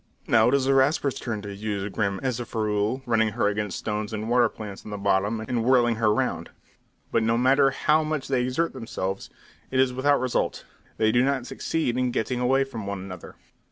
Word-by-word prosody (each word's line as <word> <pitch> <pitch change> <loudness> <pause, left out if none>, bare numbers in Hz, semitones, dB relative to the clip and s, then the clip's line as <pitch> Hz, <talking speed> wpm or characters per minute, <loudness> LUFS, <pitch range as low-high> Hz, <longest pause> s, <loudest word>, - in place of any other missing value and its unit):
Now 110 -1 +4
it 140 - +3
is 135 -1 +1
the 135 - +3
Rasper's 135 0 +2
turn 110 -4 -4
to 100 -1 -6
use 100 -1 -3
Grim 100 -2 -1
as 130 -3 -1
a 120 - -4
ferule, 110 +3 -1
running 110 -2 +2
her 115 -3 +1
against 105 -2 -2
stones 105 0 -3
and 110 +2 -3
water 120 -2 +4
plants 105 -3 -9
on - - -9
the 105 - -4
bottom, 100 +2 +1
and 115 +1 -2
whirling 120 -2 +3
her 110 -2 +3
round. 105 - -1 0.6
But 115 - +2
no 115 +1 +2
matter 135 +3 +4
how 155 +4 +2
much 155 -3 -3
they 130 -2 +1
exert 130 +7 -1
themselves, 100 -6 -4 0.4
it 130 - 0
is 130 -1 +3
without 140 +3 +2
result; 130 -1 -1 0.3
they 110 0 +3
do 120 +2 +3
not 135 -2 0
succeed 130 -6 -2
in 125 0 +1
getting 120 +1 -1
away 135 +2 +3
from 115 -7 -7
one 100 0 -3
another. 95 -2 -9
120 Hz, 210 wpm, -25 LUFS, 105-130 Hz, 0.6 s, Now